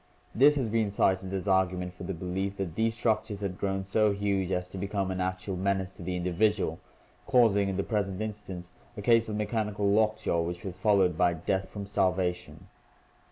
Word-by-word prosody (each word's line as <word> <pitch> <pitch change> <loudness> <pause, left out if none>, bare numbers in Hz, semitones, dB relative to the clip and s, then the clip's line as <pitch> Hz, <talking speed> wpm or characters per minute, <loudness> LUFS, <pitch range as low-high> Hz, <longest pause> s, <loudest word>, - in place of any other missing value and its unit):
This 145 +5 +6
has 125 -7 -1
been 110 -2 +1
cited 95 -1 +1
as 95 0 -3
argument 90 -1 +1
for 90 0 -9
the 95 - -3
belief 95 +3 -3
that 95 -5 -3
these 110 +4 0
structures 110 -3 0
had 95 -2 -4
grown 95 -1 -1
so 105 +2 +2
huge 100 -2 -1
as 90 0 -1
to 95 - -7
become 100 -1 -2
an 95 0 -2
actual 95 +1 -2
menace 95 0 -1
to - - -11
the 90 +1 -3
individual, 90 0 0 0.5
causing 110 -7 +4
in 95 - -2
the 100 - 0
present 100 -4 -2
instance 100 -5 -5 0.3
a 105 - -5
case 115 0 +4
of 105 - -3
mechanical 105 -1 -1
lockjaw 110 -4 +2
which 85 +1 -4
was 95 -2 -4
followed 95 -4 +2
by 90 -1 +3
death 95 +3 -2
from 100 -1 -6
starvation. 95 -2 -1
95 Hz, 190 wpm, -29 LUFS, 90-105 Hz, 0.5 s, This